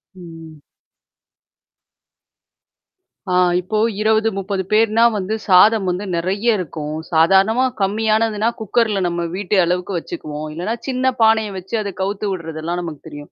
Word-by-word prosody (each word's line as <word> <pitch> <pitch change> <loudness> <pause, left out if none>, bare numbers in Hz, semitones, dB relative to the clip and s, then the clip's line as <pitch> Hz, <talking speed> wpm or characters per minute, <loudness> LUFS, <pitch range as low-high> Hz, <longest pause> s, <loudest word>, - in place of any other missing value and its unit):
ம். 165 -4 -12 2.7
ஆ, - - +2 0.2
இப்போ 185 +4 -3 0.2
20 220 +1 +2
30 195 0 -2
பேர்னா 220 +1 +3
வந்து 205 +2 -2
சாதம் 200 +2 +5
வந்து 180 +3 -3
நிறைய 200 +6 0
இருக்கும். 155 -4 -5 0.2
சாதாரணமா 195 +9 +4 0.2
கம்மியானதுனா 215 +2 +1
குக்கர் 220 +1 +1
-ல 195 - 0
நம்ம 170 0 -2
வீட்டு 200 +1 -2
அளவுக்கு 180 +2 -1
வச்சுக்குவோம், 155 - -6
இல்லனா 180 +8 -3
சின்ன 260 0 +1
பானைய 220 -2 +3
வச்சு 190 +5 -5
அத 200 -1 -4
கவுத்து 200 +2 -2
விடுறதெல்லாம் 165 -1 -4
நமக்கு 160 -4 -7
தெரியும். 145 -1 -10
195 Hz, 125 wpm, -19 LUFS, 170-220 Hz, 2.7 s, சாதம்